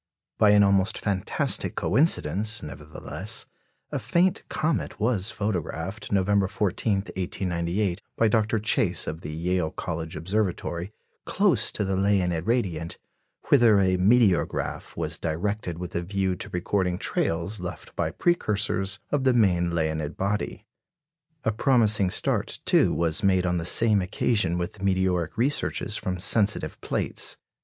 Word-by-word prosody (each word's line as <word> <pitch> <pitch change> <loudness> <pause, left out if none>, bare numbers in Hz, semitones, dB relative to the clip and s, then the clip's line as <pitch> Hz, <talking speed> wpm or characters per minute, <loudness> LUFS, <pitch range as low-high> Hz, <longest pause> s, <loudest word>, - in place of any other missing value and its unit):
By 105 - +6
an 105 0 +6
almost 100 0 +3
fantastic 95 -3 0
coincidence, 110 - +1
nevertheless, 100 +7 -4 0.5
a - - -2
faint 180 +2 +1
comet 155 -1 -2
was 110 -2 0
photographed, 100 -2 -4
November 100 0 +2
14, 105 +2 -1
1898, 90 -1 -2 0.2
by 115 - +4
Dr. 110 0 +1
Chase, 105 0 +1
of 80 +2 -5
the 75 - -7
Yale 85 +1 -1
College 80 -1 -5
Observatory, 90 0 -2 0.4
close - - +2
to 105 - -1
the 95 0 -1
Leonid 95 -3 +1
radiant, 90 -9 -1 0.5
whither 120 -7 +6
a 95 -1 +2
"meteorograph" 100 0 +1
was - - -3
directed 85 +2 -2
with 90 +1 -7
a 85 - -1
view 95 +1 -1
to - - -7
recording 90 0 -1
trails 85 +4 -1
left 90 -1 -8
by 80 - 0
precursors 100 - 0
of 145 -2 +1
the 130 -1 +4
main 90 -7 +2
Leonid 80 -1 -2
body. 100 +2 -2 0.8
A 110 - +1
promising 110 -4 +3
start, - - +1
too, - - +4
was 85 -2 +1
made 95 -2 +2
on 90 0 0
the 85 - -3
same 105 +2 +4
occasion 95 -1 0
with 90 +3 -5
meteoric 95 -3 0
researches 135 +5 0
from 90 -1 -3
sensitive 105 +2 +1
plates. - - -2
95 Hz, 135 wpm, -25 LUFS, 85-105 Hz, 0.8 s, By